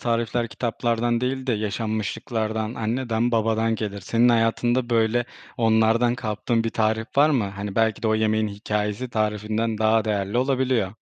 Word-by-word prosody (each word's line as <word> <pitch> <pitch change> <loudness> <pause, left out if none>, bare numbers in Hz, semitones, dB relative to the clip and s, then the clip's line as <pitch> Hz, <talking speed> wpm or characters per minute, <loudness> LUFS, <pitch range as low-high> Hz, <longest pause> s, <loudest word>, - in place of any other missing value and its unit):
tarifler 115 0 -1
kitaplardan 115 +1 -1
değil 130 +1 -2
de 125 - +1
yaşanmışlıklardan, 110 +1 -2
anneden 115 +1 -1
babadan 115 0 +1
gelir. 105 -2 -4
Senin 115 +6 +2
hayatında, 120 +2 +1
böyle, 115 +1 +2 0.3
onlardan 115 +1 +3
kaptığın 115 -1 -1
bir 115 - -1
tarif 110 +1 0
var 150 +2 +5
mı? 125 -8 +2
Hani, 100 0 -6
belki 110 -2 +1
de 110 - +1
o 110 - +3
yemeğin 110 0 +1
hikâyesi 105 +3 -3
tarifinden 110 +1 -1
daha 110 0 +3
değerli 100 +1 -1
olabiliyor. 130 -6 +1
110 Hz, 145 wpm, -24 LUFS, 110-120 Hz, 0.3 s, var